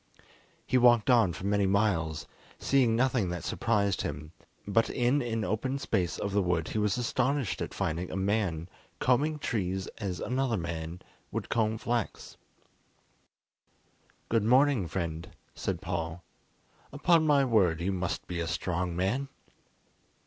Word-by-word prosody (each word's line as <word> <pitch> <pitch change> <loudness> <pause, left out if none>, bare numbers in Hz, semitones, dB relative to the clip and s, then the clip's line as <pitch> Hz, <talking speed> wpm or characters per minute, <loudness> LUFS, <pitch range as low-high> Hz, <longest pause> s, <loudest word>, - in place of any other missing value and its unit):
He 130 - +2
walked 120 -1 +5
on 115 -7 +5
for 90 +3 -7
many 100 -1 +2
miles, 85 -6 +1 0.3
seeing 130 -5 +2
nothing 125 -5 +1
that 85 -2 -4
surprised 100 -3 0
him, 75 +2 -5 0.4
but 115 +3 +2
in 125 +3 +2
an 115 -3 -2
open 130 +6 -1
space 95 -10 -1
of 100 - -3
the 100 +1 +2
wood 90 -3 0
he 110 - -1
was 105 +3 +1
astonished 130 +1 0
at - - -3
finding 85 +3 -2
a - - -5
man 95 -4 0 0.3
combing 145 +5 +2
trees 95 -8 -2
as 95 -5 -3
another 130 -2 0
man 85 0 -5 0.3
would - - -4
comb 110 -1 +1
flax. 120 0 -3 1.9
"Good 115 -2 +2
morning, 125 -3 +4
friend," 85 -1 -4 0.2
said - - -3
Paul; 85 -1 -3 0.7
"upon 160 +2 +3
my 140 -2 +4
word, 95 -10 +3
you 90 +3 -1
must 90 -2 -3
be 85 -1 -4
a 85 - -2
strong 85 +1 -2
man!" 100 +10 0
100 Hz, 140 wpm, -29 LUFS, 90-120 Hz, 1.9 s, walked